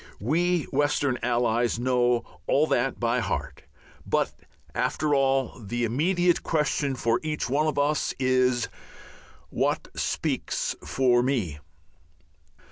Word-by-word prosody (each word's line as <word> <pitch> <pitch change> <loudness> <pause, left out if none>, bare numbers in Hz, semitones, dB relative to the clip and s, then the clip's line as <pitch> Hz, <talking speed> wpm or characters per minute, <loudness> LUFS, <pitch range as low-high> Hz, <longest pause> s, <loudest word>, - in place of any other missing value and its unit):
We 170 - +1
Western 140 -2 +1
allies 120 -1 +1
know 125 -1 +2 0.2
all 145 +3 +3
that 135 -3 0
by 120 +1 +1
heart; 110 - -4 0.4
but, - - 0 0.4
after 150 -1 0
all, 135 -2 +1
the 120 +4 -2
immediate 175 - +2
question 150 -3 0
for 115 -1 +1
each 155 -1 -2
one 145 +5 +1
of 155 - -1
us 145 +1 +1
is, 130 -2 +2 0.9
"_What - - -1
speaks - - -2
for 125 -2 +2
me? 115 - -1
130 Hz, 115 wpm, -26 LUFS, 120-150 Hz, 0.9 s, all